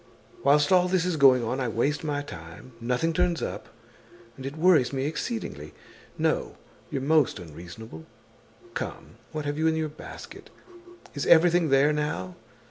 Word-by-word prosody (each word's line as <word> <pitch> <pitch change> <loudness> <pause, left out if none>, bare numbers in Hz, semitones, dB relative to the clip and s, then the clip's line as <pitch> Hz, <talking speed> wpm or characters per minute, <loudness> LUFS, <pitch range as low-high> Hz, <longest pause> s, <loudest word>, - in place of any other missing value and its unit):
Whilst 145 +2 +4
all 180 -1 +5
this 180 -1 +1
is 180 -2 0
going 130 -4 +6
on, 125 +4 -2
I 130 - -1
waste 135 +7 0
my 145 -2 -2
time, 85 - -11
nothing 125 +8 0
turns 170 0 +1
up, - - -5 0.7
and 135 +1 -7
it 140 +3 -7
worries 160 -6 +4
me 135 -1 -2
exceedingly. 220 - -4 0.4
No, 485 -3 0 0.3
you're 140 -5 -3
most 155 -3 +3
unreasonable. 85 +1 -10 0.7
Come, - - -6
what 155 -1 -4
have 145 +1 -2
you 160 - +2
in 160 - +2
your 160 -1 -1
basket? 150 - -11 0.6
Is 145 - -3
everything 170 0 +5
there 135 +2 +4
now? 95 -12 -3
145 Hz, 155 wpm, -26 LUFS, 125-160 Hz, 0.7 s, going